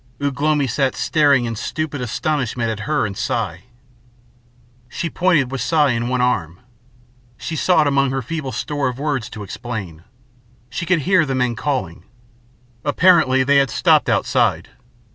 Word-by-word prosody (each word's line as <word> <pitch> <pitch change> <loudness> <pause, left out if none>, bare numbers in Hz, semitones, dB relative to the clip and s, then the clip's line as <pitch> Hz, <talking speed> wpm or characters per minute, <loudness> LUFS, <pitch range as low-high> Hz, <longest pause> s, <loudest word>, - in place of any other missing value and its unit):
Ugh 140 -1 -3
lomi 150 -2 +2
sat 130 +2 0
staring 145 -5 +2
in 115 -1 -3
stupid 150 +4 -4
astonishment 125 -2 -1
at 110 +2 -6
her 150 -6 +1
and 100 -2 -5
Si. - - -3 1.2
She 170 +7 -4
pointed 165 -8 +2
with 135 -3 -3
Si 150 +3 +2
in 115 0 -2
one 125 0 0
arm. 90 -9 -1 0.8
She 165 - -5
sought 160 -1 +3
among 140 -1 +2
her 135 0 -2
feeble 150 0 -4
store 145 -1 -2
of 125 -1 -4
words 140 -5 -2
to 105 - -8
explain. 95 -6 -7 0.7
She 170 - -4
could 180 -4 +2
hear 185 +2 +3
the 135 -3 -2
men 125 -2 0
calling. 125 - -3 0.8
Apparently 145 -4 +4
they 140 +2 +3
had 135 -2 +3
stopped - - +3
outside. - - +1
135 Hz, 155 wpm, -20 LUFS, 120-150 Hz, 1.2 s, Apparently